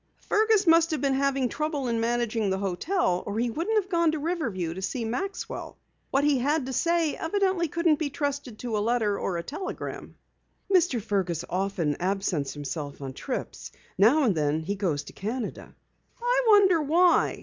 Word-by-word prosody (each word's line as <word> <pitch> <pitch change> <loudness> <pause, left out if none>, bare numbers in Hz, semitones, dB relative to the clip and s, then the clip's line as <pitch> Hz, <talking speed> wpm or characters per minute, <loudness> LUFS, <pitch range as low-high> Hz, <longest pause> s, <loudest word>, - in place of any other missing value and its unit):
"Fergus 430 -1 +2
must 330 0 +5
have 310 -3 -1
been 275 -1 +2
having 275 -1 +1
trouble 295 0 -2
in 230 -1 0
managing 230 -2 0
the 190 - 0
hotel 195 - 0
or 205 +1 -3
he 235 +1 0
wouldn't 360 - -1
have 390 -1 -7
gone 335 -2 +3
to - - -1
Riverview 265 - -2
to 190 - -7
see 230 +4 -3
Maxwell. 260 - -4 0.3
What 275 +1 +1
he 290 -3 +3
had 290 +2 +1
to 265 - -4
say 335 +2 +1
evidently 375 0 0
couldn't 330 -1 +1
be 305 -3 -1
trusted 285 -5 -3
to 235 -2 -3
a - - +1
letter 215 -2 +1
or 180 - -2
a 170 - -4
telegram." 310 - -6 0.6
"Mr. 345 -9 +3
Fergus 185 -6 -1
often 180 -5 -1
absents 185 -7 -1
himself 145 0 -5
on 135 -2 -6
trips. - - -5 0.2
Now 240 +11 +5
and 225 -7 +3
then 150 0 0
he 185 +6 -2
goes 175 -8 -1
to - - -12
Canada." 220 +3 -5 0.4
"I - - +1
wonder 390 -6 +6
why?" 340 +4 +3
255 Hz, 180 wpm, -27 LUFS, 195-330 Hz, 0.6 s, wonder